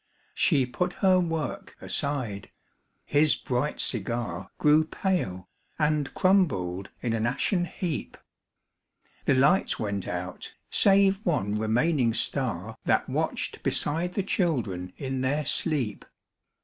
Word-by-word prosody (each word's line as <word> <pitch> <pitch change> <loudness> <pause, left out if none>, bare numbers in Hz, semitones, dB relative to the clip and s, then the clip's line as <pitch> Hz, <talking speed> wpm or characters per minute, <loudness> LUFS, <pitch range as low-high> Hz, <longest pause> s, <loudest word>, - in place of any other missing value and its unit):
She 140 -7 +3
put 180 +9 -2
her 185 -1 +6
work 175 +3 -3
aside; 130 -9 -2 0.6
his 150 +1 +4
bright 130 +4 -2
cigar 115 -7 -2
Grew 150 +1 +5
pale, 155 - -2 0.3
and 150 -2 +1
crumbled 100 - +2
in 120 -2 -1
an 115 0 0
ashen 175 - +1
heap. 170 -3 -4 1.1
The 140 - +4
lights 145 +9 +3
went 100 -4 -3
out, 90 +1 -5 0.2
save 195 0 +4
one 105 - 0
remaining 120 +2 +2
star 110 -4 -1
That - - +2
watched - - -2
beside 165 +4 0
the 200 - 0
children 120 - -1
in 135 -1 -3
their 145 +3 0
sleep. 135 -6 -1
140 Hz, 115 wpm, -27 LUFS, 110-170 Hz, 1.1 s, her